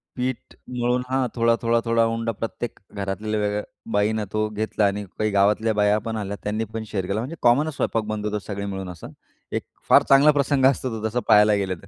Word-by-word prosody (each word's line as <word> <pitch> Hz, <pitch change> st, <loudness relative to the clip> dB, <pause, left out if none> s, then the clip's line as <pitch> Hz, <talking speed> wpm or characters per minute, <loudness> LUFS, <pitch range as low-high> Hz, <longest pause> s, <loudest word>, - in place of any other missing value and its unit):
पीठ 125 Hz, 0 st, -4 dB, 0.3 s
मळून 125 Hz, +1 st, +1 dB
हां, 130 Hz, -1 st, +1 dB
थोडा, 115 Hz, -1 st, +3 dB
थोडा, 115 Hz, 0 st, +2 dB
थोडा 115 Hz, 0 st, +3 dB
उंडा 115 Hz, 0 st, -1 dB
प्रत्येक 115 Hz, +2 st, -5 dB
घरात 100 Hz, -1 st, -4 dB
वेगळ्या 105 Hz, -1 st, -1 dB, 0.3 s
बाईनं 105 Hz, +1 st, +1 dB
तो 110 Hz, 0 st, +1 dB
घेतला 105 Hz, 0 st, -1 dB
आणि 100 Hz, +1 st, -1 dB
काही 110 Hz, -, +1 dB
गावातल्या 105 Hz, +3 st, +2 dB
बाया 105 Hz, 0 st, +3 dB
पण 115 Hz, -, -2 dB
आल्या, 100 Hz, -1 st, -4 dB
त्यांनी 105 Hz, +2 st, -1 dB
पण 110 Hz, 0 st, -3 dB
शेअर 95 Hz, -3 st, -3 dB
केला, 100 Hz, +3 st, -1 dB
म्हणजे 130 Hz, +8 st, -5 dB
कॉमनच 140 Hz, +6 st, +3 dB
स्वयंपाक 115 Hz, -4 st, 0 dB
बनत 105 Hz, -1 st, -3 dB
होता 105 Hz, 0 st, -1 dB
सगळे 100 Hz, -1 st, -4 dB
मिळून 95 Hz, -2 st, -5 dB
असं, 85 Hz, -3 st, -9 dB, 0.4 s
एक -, -, -2 dB, 0.3 s
फार -, -, +7 dB
चांगला 140 Hz, +2 st, +7 dB
प्रसंग 140 Hz, -2 st, +2 dB
असतो 130 Hz, -1 st, +2 dB
तो, 110 Hz, 0 st, -2 dB
जसा 120 Hz, +3 st, -1 dB
पाहायला 105 Hz, 0 st, +6 dB
गेलं 95 Hz, -2 st, -1 dB
तर. -, -, -14 dB
110 Hz, 205 wpm, -23 LUFS, 105-115 Hz, 0.4 s, फार